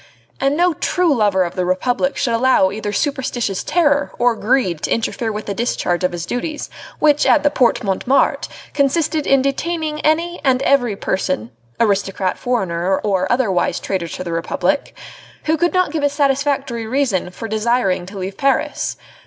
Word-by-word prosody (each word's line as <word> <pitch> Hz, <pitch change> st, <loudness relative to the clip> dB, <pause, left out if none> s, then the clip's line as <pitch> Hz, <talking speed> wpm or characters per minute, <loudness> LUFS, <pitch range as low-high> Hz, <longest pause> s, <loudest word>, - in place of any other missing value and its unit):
and 275 Hz, +2 st, +1 dB
no 355 Hz, 0 st, +3 dB
true 345 Hz, +1 st, +1 dB
lover 205 Hz, -6 st, +2 dB
of 175 Hz, -, -4 dB
the 185 Hz, -, -1 dB
Republic 245 Hz, +9 st, 0 dB
should 240 Hz, -4 st, 0 dB
allow 230 Hz, -5 st, +3 dB
either 205 Hz, 0 st, -4 dB
superstitious 245 Hz, -5 st, -1 dB
terror 295 Hz, -3 st, +2 dB
or 240 Hz, -1 st, +2 dB
greed 215 Hz, -, 0 dB
to -, -, -2 dB
interfere 230 Hz, 0 st, -1 dB
with 210 Hz, 0 st, -5 dB
the 200 Hz, -, -3 dB
discharge 190 Hz, -5 st, -1 dB
of 180 Hz, -, +2 dB
his 175 Hz, -1 st, -5 dB
duties 295 Hz, -, -4 dB, 0.3 s
which 295 Hz, -1 st, +3 dB
at 305 Hz, -, +4 dB
the 290 Hz, -, +3 dB
Porte 245 Hz, -3 st, +2 dB
Montmartre 215 Hz, +7 st, +1 dB, 0.2 s
consisted 305 Hz, +2 st, +1 dB
in 275 Hz, -1 st, +4 dB
detaining 305 Hz, +2 st, -2 dB
any 335 Hz, +3 st, 0 dB
and 265 Hz, -1 st, +2 dB
every 245 Hz, -7 st, +2 dB
person 185 Hz, -, -2 dB, 0.3 s
aristocrat, 195 Hz, -3 st, 0 dB
foreigner, 190 Hz, -6 st, 0 dB
or 190 Hz, -3 st, 0 dB
otherwise 220 Hz, -8 st, +1 dB
traitor 185 Hz, -3 st, -3 dB
to 185 Hz, -, -6 dB
the 170 Hz, -, -5 dB
Republic 175 Hz, -, -1 dB, 0.5 s
who 315 Hz, -, +2 dB
could 345 Hz, +2 st, +1 dB
not 365 Hz, -4 st, +1 dB
give 315 Hz, -1 st, -2 dB
a 285 Hz, -, +3 dB
satisfactory 275 Hz, -4 st, 0 dB
reason 240 Hz, -8 st, 0 dB
for 205 Hz, +5 st, -7 dB
desiring 215 Hz, -4 st, 0 dB
to 200 Hz, +1 st, -9 dB
leave 190 Hz, +1 st, -5 dB
Paris. 275 Hz, 0 st, 0 dB
245 Hz, 170 wpm, -19 LUFS, 195-285 Hz, 0.5 s, at